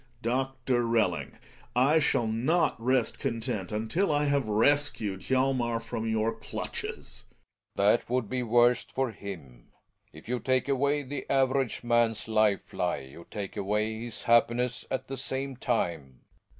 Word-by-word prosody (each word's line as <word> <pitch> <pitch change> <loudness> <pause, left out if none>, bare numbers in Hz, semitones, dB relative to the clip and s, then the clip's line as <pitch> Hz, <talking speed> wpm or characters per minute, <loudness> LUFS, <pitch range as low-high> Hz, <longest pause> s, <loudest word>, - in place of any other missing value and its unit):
Doctor 130 0 0
Belling, 115 -1 0 0.4
I 140 +6 +5
shall 140 -5 +2
not 125 +11 +1
rest 125 -2 +1
content 115 -7 -2
until 115 - 0
I 145 0 +2
have 140 -4 +1
rescued 110 -3 +2
Hjalmer 130 -1 +1
from 115 0 -4
your 110 0 +1
clutches! 115 - -6 0.5
Belling. 105 +3 +4
That - - -22
would 125 -2 0
be 130 +4 -2
worst 120 +1 +3
for 130 -2 -1
him. 80 - -9 0.4
If 80 - -14
you 125 +1 -1
take 130 0 +1
away 140 +1 +1
the 135 0 -6
average 135 -3 +1
man's 115 -2 +1
life 110 -3 +1
lie - - -1
you 85 +4 -13
take 100 -3 -6
away 105 +2 -1
his 120 - -7
happiness 120 +1 +2
at 130 - -3
the 135 - -5
same 135 +1 -3
time. 85 - -2
120 Hz, 145 wpm, -29 LUFS, 110-130 Hz, 0.5 s, I